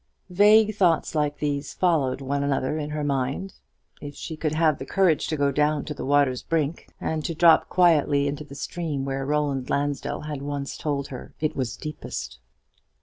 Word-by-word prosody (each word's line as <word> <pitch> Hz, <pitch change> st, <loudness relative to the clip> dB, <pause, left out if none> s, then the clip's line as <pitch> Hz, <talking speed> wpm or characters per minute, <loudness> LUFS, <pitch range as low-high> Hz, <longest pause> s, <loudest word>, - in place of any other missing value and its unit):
Vague 210 Hz, +3 st, +5 dB
thoughts 175 Hz, -6 st, +2 dB
like 150 Hz, -2 st, 0 dB
these 145 Hz, -1 st, -3 dB
followed 150 Hz, -8 st, +1 dB
one 140 Hz, +1 st, -1 dB
another 140 Hz, 0 st, 0 dB
in 150 Hz, -1 st, -3 dB
her 150 Hz, 0 st, -3 dB
mind. 140 Hz, +6 st, -2 dB, 0.5 s
If 145 Hz, -1 st, -8 dB
she 160 Hz, -, -6 dB
could 155 Hz, -1 st, -2 dB
have 155 Hz, -2 st, +2 dB
the 135 Hz, -, -5 dB
courage 175 Hz, -6 st, +2 dB
to 155 Hz, -, -2 dB
go 140 Hz, -1 st, +2 dB
down 150 Hz, +1 st, +1 dB
to 150 Hz, -, -4 dB
the -, -, -7 dB
water's 140 Hz, -2 st, +2 dB
brink, 160 Hz, -1 st, -2 dB
and 155 Hz, -1 st, -2 dB
to 165 Hz, -, -3 dB
drop 165 Hz, 0 st, +5 dB
quietly 150 Hz, -5 st, +3 dB
into 145 Hz, +1 st, -3 dB
the 140 Hz, -1 st, -12 dB
stream 150 Hz, -3 st, -3 dB
where 135 Hz, 0 st, -3 dB
Roland 145 Hz, -3 st, -1 dB
Lansdell 145 Hz, 0 st, -1 dB
had 150 Hz, -2 st, -5 dB
once 140 Hz, -1 st, -4 dB
told 140 Hz, -2 st, -3 dB
her 130 Hz, -, -9 dB
it 155 Hz, 0 st, -1 dB
was 130 Hz, -2 st, -3 dB
deepest. 150 Hz, -, -6 dB
145 Hz, 185 wpm, -25 LUFS, 140-160 Hz, 0.5 s, Vague